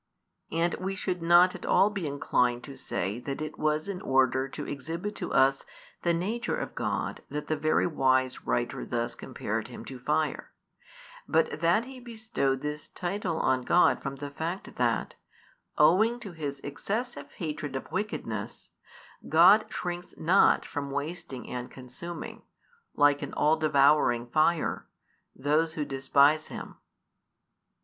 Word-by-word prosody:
And 165 +2 +1
we 190 +1 -3
should 180 -2 -2
not 175 +2 +6
at - - -9
all 205 - +4
be 195 -6 -3
inclined 125 -3 +1
to 140 - -9
say 100 0 -3
that 135 +2 -5
it 155 0 -6
was 155 +2 0
in 195 -2 -4
order 130 0 +2
to - - -6
exhibit 165 +9 -5
to - - -4
us 135 +1 +3 0.4
the 170 - +2
nature 200 +8 -1
of - - -5
God - - -2
that 150 0 -4
the 155 - 0
very 155 +1 +2
wise 130 -5 +1
writer 120 - -1
thus 120 0 -2
compared - - -4
Him - - -9
to - - -8
fire, - - -1 0.7
but - - +1
that 175 +8 +3
he 260 0 -10
bestowed 220 - -2
this 150 +1 -4
title 180 -2 -3
on 130 -1 +2
God 175 +8 +4
from 135 -1 -4
the 140 +1 -7
fact 165 +6 -5
that, 120 -4 0 0.6
owing 215 +10 +4
to 205 -5 -7
His 145 -4 -5
excessive 220 - -4
hatred 150 -6 -4
of 135 - -6
wickedness, 210 +2 -4 0.6
God - - +7
shrinks 175 0 -5
not 175 +5 +4
from 140 -1 -4
wasting 145 -2 -5
and 125 0 -5
consuming, 130 +7 -8 0.5
like 145 -1 +4
an - - -5
all 150 +2 +3
devouring 140 -5 +3
fire, 155 +5 +1 0.5
those 155 +4 +1
who 150 -2 -2
despise 140 +3 +3
Him. - - -8
150 Hz, 145 wpm, -28 LUFS, 135-175 Hz, 0.7 s, God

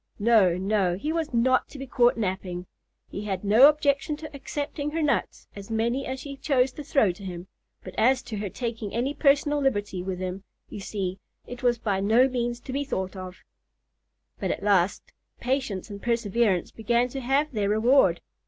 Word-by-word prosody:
No, 205 -5 +4
no; 190 -2 +1
he 300 +11 -3
was 325 -2 -2
not 255 +2 +2
to - - -11
be 270 - -6
caught 245 -2 +3
napping. 185 -4 -3 0.5
He 205 - -5
had 190 -2 -3
no 220 +8 +7
objection 295 0 0
to 310 -1 -9
accepting 290 +1 -4
her 325 +2 -2
nuts, 295 - -1
as 200 +1 -9
many 235 +4 -1
as 260 0 -4
she 275 0 -8
chose 265 -2 +2
to 295 - -8
throw 270 -8 +3
to 185 +3 -12
him; 180 -2 -6 0.4
but - - -9
as 255 +3 +3
to 235 -4 -6
her 200 -1 -3
taking 225 -2 -5
any 255 +5 0
personal 290 0 +3
liberty 205 -8 -1
with 185 0 -4
him, 185 +1 -5 0.3
you - - -7
see, 195 -2 -4 0.3
it 245 0 -9
was 245 -1 +2
by 205 -4 -1
no 225 +6 +4
means 240 -2 -2
to 255 - -7
be 280 +1 0
thought 190 -8 -3
of. 185 +1 -9 1.0
But - - -2
at - - -3
last 200 -2 +2 0.4
patience 245 -7 -2
and 200 0 -8
perseverance 230 -5 +1
began 235 +2 +1
to 270 - -5
have 275 +4 +1
their 210 -5 -1
reward. 220 -4 +4
235 Hz, 190 wpm, -26 LUFS, 195-270 Hz, 1.0 s, no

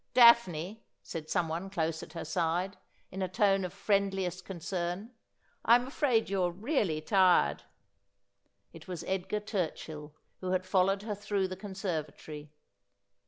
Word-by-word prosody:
' - - -48
Daphne,' 215 -4 +5 0.2
said 155 -1 -6
someone 170 +3 -1
close 165 -4 -1
at 160 - -10
her 170 - -5
side, 175 +4 0 0.4
in 190 - -5
a 185 - +1
tone 195 +1 +2
of 180 - -3
friend 200 0 +1
liest 185 -1 -3
concern, 180 +3 -4 0.5
'I'm 240 +2 +5
afraid 260 -4 +1
you're 185 -2 +1
really 195 - 0
tired.' 180 - +4 1.1
It - - -12
was 180 -2 -5
Edgar 190 +2 -2
Turchill, 160 -7 -4 0.3
who 185 0 -2
had 185 0 0
followed 195 +1 +2
her 215 -1 -2
through 205 -2 -1
the 185 - -4
conservatory. 160 -6 -5
185 Hz, 140 wpm, -31 LUFS, 170-200 Hz, 1.1 s, Daphne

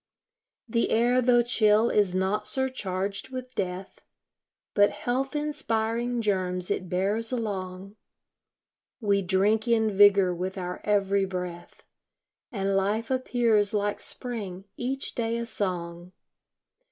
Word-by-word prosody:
The 230 0 0
air, 245 +3 +3
tho' 240 -1 +4
chill, 220 -1 +4
is 200 -3 +2
not 195 +3 0
surcharged 200 -7 -2
with 255 -1 -7
death, 185 -2 -4 0.7
But 205 0 +5
health 265 +4 -2
inspiring 240 -5 -1
germs 185 -3 -1
it 185 - -2
bears 205 +6 0
along. 195 -4 -4 1.0
We 200 -4 +2
drink 200 +5 +2
in 220 -2 +3
vigor 200 -2 +5
with 185 +2 -4
our 180 -1 -5
every 200 -1 +2
breath, 180 -2 -7 0.7
And 195 -4 -1
life 210 +5 0
appears 235 -5 +2
like 205 0 0
spring, 205 -7 -4
each 265 +2 -3
day 230 -1 -1
a 235 - -3
song. 180 -5 -4
205 Hz, 115 wpm, -27 LUFS, 190-235 Hz, 1.0 s, But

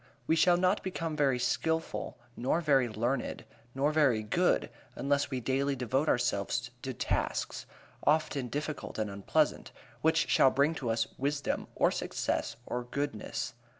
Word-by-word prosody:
We 160 - +3
shall 175 +2 +5
not 185 +3 +2
become 165 -4 -3
very 140 -4 +2
skilful, 160 +6 -1 0.2
nor 130 +7 +1
very 135 -7 +3
learned, 120 +5 -2 0.3
nor 140 +3 +2
very 135 -8 +3
good 105 - +1 0.2
unless 140 +1 +1
we 130 -2 -2
daily 135 +3 0
devote 130 +4 0
ourselves 120 +1 0
to 130 - -3
tasks 125 - -2 0.4
often 150 -3 +2
difficult 150 +3 -4
and 105 -2 -1
unpleasant 100 0 0 0.3
which 160 +1 +3
shall 135 - +5
bring 140 +4 +2
to 135 -7 -3
us 115 0 +1
wisdom, 140 +2 -1
or - - +3
success, - - -2
or 125 0 -3
goodness. 140 -3 -3
140 Hz, 145 wpm, -31 LUFS, 125-155 Hz, 0.4 s, shall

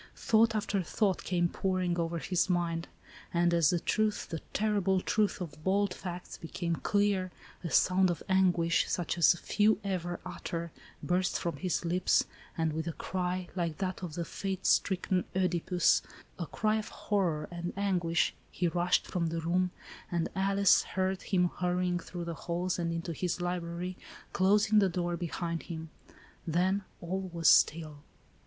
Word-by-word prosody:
Thought 225 0 +3
after 205 -2 0
thought 190 +2 0
came 175 -2 +1
pouring 185 -1 -1
over 170 0 -1
his 175 +5 0
mind, 170 -2 0 0.4
and 175 0 +2
as 165 -3 +4
the 175 - +2
truth, 215 +4 0
the 165 - -3
terrible 200 -3 +1
truth 210 +2 +1
of 155 -4 -7
bald 195 +1 +2
facts, 180 -1 -7
became 170 +1 -3
clear, 200 -2 +1 0.3
a 170 - -3
sound 185 +2 +4
of 170 -3 -3
anguish, 180 -3 +3
such 175 -3 -1
as 170 - +6
few 210 +4 +2
ever 175 -3 -2
utter, 170 -2 -5 0.3
burst 180 +1 +1
from 170 -4 -3
his 180 +1 -1
lips, 180 +2 +2 0.2
— - - -23
and 160 -1 0
with 160 +2 -3
a 165 - -2
cry, 180 0 -3
like 170 -4 -2
that 190 -1 -3
of 170 -4 -5
the 170 - -2
fate 190 +1 -4
stricken 185 -1 +2
CEdipus, 180 -1 +2 0.4
a 170 - -3
cry 215 +5 +1
of 215 - -4
horror 175 -7 -1
and 175 0 -4
anguish, 180 -4 +1 0.2
he 180 - -1
rushed 175 +1 +2
from 170 -2 -1
the 165 0 -2
room, 180 +2 +1 0.2
— - - -17
and 170 -2 0
Alice 195 0 +4
heard 190 0 -2
him 180 -3 +2
hurrying 180 0 +1
through 175 0 -6
the 170 - -3
halls 175 +3 -2
and 170 -1 -1
into 165 0 -3
his 180 +2 -2
library, 175 0 -3 0.4
closing 210 +3 +4
the 195 -2 +3
door 175 -1 -1
behind 170 -1 -3
him. 160 -2 -7 0.6
Then 185 +4 +1 0.2
all 185 +2 -3
was 165 -2 0
still. 155 -2 +4
180 Hz, 165 wpm, -31 LUFS, 170-190 Hz, 0.6 s, as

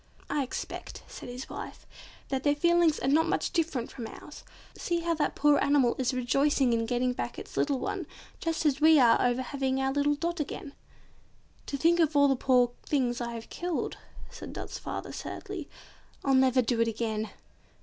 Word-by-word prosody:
"I 295 - +1
expect," 260 - -6
said - - -9
his 250 +2 -7
wife, - - -8 0.4
"that 265 -1 -1
their 290 +1 +2
feelings 340 0 +3
are - - -1
not 315 +4 +4
much 390 - 0
different 315 - -1
from 235 -4 -6
ours. - - -11 0.3
See 345 -1 -1
how 335 0 0
that 310 -2 -1
poor 295 0 +4
animal 275 -4 +3
is 260 0 +1
rejoicing 260 +1 +2
in 230 0 0
getting 250 +1 +1
back - - -4
its - - -9
little 285 -2 +1
one, - - -3 0.3
just 330 -1 -2
as 285 -1 +2
we 315 0 +7
are 235 -3 +5
over 245 +1 +1
having 265 0 -1
our 265 0 0
little 290 +1 +2
Dot 340 +3 -2
again." 295 +1 -5 0.9
"To 280 - -2
think 335 +4 +3
of 315 -2 +2
all 285 0 +6
the 270 - +3
poor 250 -1 +3
things 250 -4 0
I 235 0 -3
have 230 0 -8
killed," 350 -2 -3 0.3
said - - -9
Dot's - - -6
father - - -5
sadly, - - -6 0.6
"I'll 275 - +3
never 260 -1 +4
do 230 0 +1
it 230 - +3
again." 220 -1 -2
270 Hz, 190 wpm, -29 LUFS, 245-300 Hz, 0.9 s, we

